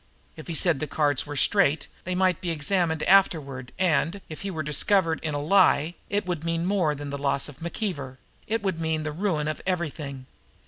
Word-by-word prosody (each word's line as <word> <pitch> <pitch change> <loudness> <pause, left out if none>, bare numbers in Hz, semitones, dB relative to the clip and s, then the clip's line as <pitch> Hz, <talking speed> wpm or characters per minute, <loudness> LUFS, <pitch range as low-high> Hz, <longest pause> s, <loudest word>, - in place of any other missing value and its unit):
If 155 - -11
he 170 - -4
said 165 -4 +4
the 155 - -3
cards 145 -1 0
were 145 - -5
straight 160 0 +3 0.2
they 180 0 -2
might 185 -2 +2
be 180 - -3
examined 160 0 0
afterward; 145 -10 +2
and, 175 +1 +1
if 155 - -8
he 195 - -3
were 160 -4 -3
discovered 165 +3 +2
in 155 -2 -3
a - - -1
lie, 165 -1 +3 0.2
it 205 -1 -1
would 175 -4 -3
mean 165 0 -1
more 180 -6 +1
than 145 0 -6
the 140 - -4
loss 140 0 +2
of 145 -1 -12
McKeever 165 - -4 0.3
it 225 0 -1
would 185 -4 -1
mean 160 -1 0
the 155 - -3
ruin 160 -3 -1
of 155 - -3
everything. 150 -7 -3
160 Hz, 200 wpm, -26 LUFS, 145-185 Hz, 0.3 s, said